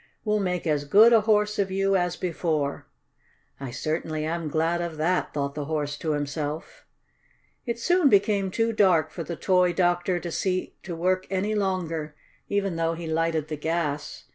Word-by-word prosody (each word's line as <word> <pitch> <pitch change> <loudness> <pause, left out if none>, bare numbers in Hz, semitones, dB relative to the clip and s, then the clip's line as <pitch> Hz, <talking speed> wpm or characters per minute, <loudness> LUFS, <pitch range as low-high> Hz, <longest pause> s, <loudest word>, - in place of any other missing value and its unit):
"We'll 210 0 +2
make 180 -3 -2
as 150 -3 +1
good 215 +10 +7
a 225 - +6
Horse 210 -1 +2
of 195 -1 +1
you 195 +1 +1
as 180 -2 +1
before." 160 -5 -2 0.7
"I 135 -2 -5
certainly 155 +4 -3
am 165 0 -2
glad 165 +3 0
of 170 -2 -4
that," 175 +4 0
thought 140 -1 -2
the 150 -1 -4
Horse 145 -1 -2
to 155 -2 -1
himself. 145 +1 -4 0.8
It 235 -1 -1
soon 350 +5 +3
became 200 -2 +3
too 225 +4 0
dark 180 -7 +3
for 170 - -5
the 170 - -5
toy 180 0 +2
doctor 175 0 +1
to 170 0 -6
see 185 +2 -2
to 175 -3 -6
work 185 +2 0
any 195 +3 -1
longer, 170 -7 -2 0.3
even 200 -4 0
though 165 0 0
he 170 0 -7
lighted 160 -1 0
the 155 - -4
gas. 150 -1 -3
175 Hz, 175 wpm, -26 LUFS, 155-195 Hz, 0.8 s, good